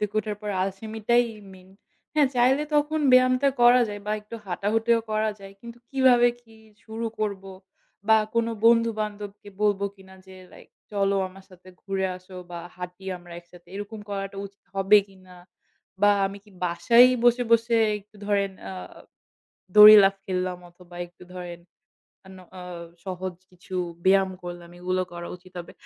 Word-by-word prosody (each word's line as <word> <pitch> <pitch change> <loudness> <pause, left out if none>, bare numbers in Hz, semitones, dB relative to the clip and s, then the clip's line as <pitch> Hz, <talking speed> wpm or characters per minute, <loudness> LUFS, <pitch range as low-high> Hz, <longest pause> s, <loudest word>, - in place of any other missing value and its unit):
থেকে 210 0 -3
ওঠার 210 -1 -3
পর 210 - -3
আলসেমিটাই 220 +5 0 0.3
main। 185 0 -16 0.5
হ্যাঁ, 290 -3 +4
চাইলে 255 +4 +3
তখন 295 +1 +1
ব্যায়ামটা 255 +2 +5
করা 245 +1 +7
যায় 205 0 -6
বা 210 - -1
একটু 210 +2 -12
হাঁটা-হুঁটিও 225 +5 +1
করা 215 0 +1
যায়। 195 0 -11
কিন্তু 235 0 -11
কীভাবে 255 -3 +5
কী 225 -1 -20 0.3
শুরু 225 +1 -5
করব 200 -3 -2 0.7
বা 220 - +7 0.2
কোনো 230 0 +1
বন্ধু-বান্ধবকে 215 -3 +1
বলব 205 -2 +2 0.2
কিনা 190 0 -16
যে 190 - -13 0.2
like - - -17 0.2
"চলো 200 -1 +1
আমার 190 +1 -16
সাথে 185 0 -17
ঘুরে 195 -1 -1
আসো 185 0 -14
বা 175 - -6 0.2
হাঁটি 180 +1 -9
আমরা 175 0 -14
একসাথে," 175 0 -19
এরকম 205 +2 -7
করাটা 195 0 -5
উচিত 200 +1 -21
হবে 195 +2 +6
কীনা? 185 -1 -17 0.7
বা 205 - +7 0.2
আমি 195 +1 -7
কী 210 - -20
বাসায়ই 235 +9 +5
বসে, 240 +1 +4
বসে 230 0 +3 0.2
একটু 205 +1 -21
ধরেন 200 -1 0 0.2
আ - - -6 1.0
দড়ি 210 0 +11
লাফ 195 0 +3
খেল্লাম 185 -1 -2
অথবা 175 0 -17
একটু 175 +1 -18
ধরেন 175 -1 -7 0.7
অন্য 190 0 -13 0.2
অ - - -9 0.4
সহজ 185 -1 -5 0.2
কিছু 180 +1 -10 0.3
ব্যায়াম 190 0 +4
করলাম, 175 -1 -8
এগুলো 185 +1 -1
করা 175 0 -7
উচিত 185 +1 -20
হবে? 170 - -9
200 Hz, 155 wpm, -25 LUFS, 185-225 Hz, 1.0 s, দড়ি